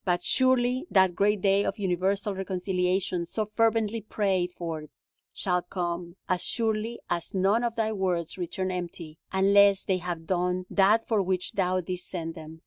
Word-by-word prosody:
But 175 -1 0
surely 255 +2 +2
that 190 -3 +4
great 205 +2 +1
day 195 +1 +3
of - - -2
universal 195 +2 0
reconciliation, 185 -1 -1
so 215 +4 -2
fervently 225 0 +1
prayed 195 -4 0
for, 165 -3 -4 0.5
shall 180 -2 0
come, 175 -1 -4
as 180 -1 0
surely 225 0 -1
as 170 +2 -3
none 195 +5 +2
of 235 -1 -1
Thy 220 -2 0
words 180 -5 -1
return 185 +1 -3
empty, 170 -3 -6
unless 200 0 +5
they 190 - +1
have 175 -2 -5
done 180 +1 0
that 210 +3 +3
for 220 -3 +2
which 185 -1 -1
Thou 185 -1 0
didst 180 +1 -5
send 165 -3 -4
them. 160 0 -10
190 Hz, 160 wpm, -27 LUFS, 180-210 Hz, 0.5 s, unless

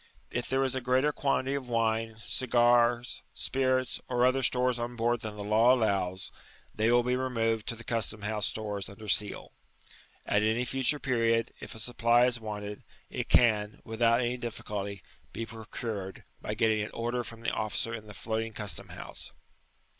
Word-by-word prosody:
If 125 - -2
there 135 +1 +2
is 130 -1 0
a 130 - -2
greater 130 +4 +2
quantity 140 -2 0
of 140 -3 -3
wine, 115 -1 0
cigars, 120 -1 +3
spirits, 130 -1 0
or 125 -1 0
olher 130 +1 +4
stores 125 -1 +2
on 120 +1 -3
board 120 0 +1
than 105 -1 -6
the 100 - -4
law 110 +5 +5
allows, 95 -5 0 0.4
they 110 +1 +2
will 120 0 +5
be 125 +1 +1
removed 115 -4 0
to 115 - -2
the 115 - -10
custom 110 -2 -1
house 105 -1 0
stores 105 -3 -4
under 105 +2 -11
seal. 105 0 +2 0.7
At 105 - +2
any 110 +3 +1
future 135 +4 +1
period, 115 -4 +1
if - - -8
a - - -7
supply 120 +1 +3
is 125 -1 +1
wanted, 105 -2 -6 0.3
it - - -3
can, 105 -3 +4
^ - - -21
without 115 +2 +2
any 125 +1 0
difficulty, 100 -5 -5 0.3
be 115 - -3
procured, 110 -3 -6 0.2
by - - -3
getting 110 -1 +2
an 105 - -3
order 120 +1 -1
from 115 -1 -10
the 115 - 0
officer 110 +1 -1
in 110 -2 -7
the 105 - -10
floating 110 0 -3
custom 105 -1 -4
house. - - -8
115 Hz, 175 wpm, -30 LUFS, 110-125 Hz, 0.7 s, law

